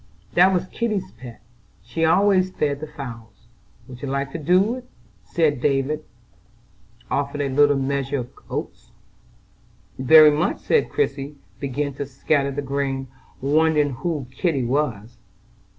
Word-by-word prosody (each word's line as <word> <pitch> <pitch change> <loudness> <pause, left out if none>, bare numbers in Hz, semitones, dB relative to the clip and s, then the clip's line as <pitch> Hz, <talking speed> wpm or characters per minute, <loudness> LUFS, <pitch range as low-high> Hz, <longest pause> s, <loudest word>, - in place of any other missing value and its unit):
"That 180 +2 +6
was 180 -1 0
Kitty's 210 - -3
pet, 120 0 -12 0.4
she 120 +9 -3
always 185 +2 +4
fed 145 -6 -1
the 155 - -6
fowls. 115 -9 -10 0.4
Would 125 -2 -11
you 140 - -4
like 140 0 -2
to 165 - -5
do 185 +8 +3
it?" 250 0 -12 0.5
and 150 -6 +2
David 145 +2 0 1.1
offered 140 +1 -1
a 140 - -1
little 145 +1 +4
measure 140 +1 -1
of 125 -2 -5 0.2
oats. - - -6 1.1
"Very 155 +3 +8
much;" 150 +3 -1
and 460 - +3
Christie 145 - -2 0.2
began 140 +1 -2
to 140 - -4
scatter 140 +1 0
the 140 +1 -4
grain, 135 -1 -2 0.3
wondering 150 +1 +2
who 140 +2 -3
"Kitty" 140 0 0
was. 120 -4 -2
140 Hz, 135 wpm, -22 LUFS, 135-160 Hz, 1.1 s, Very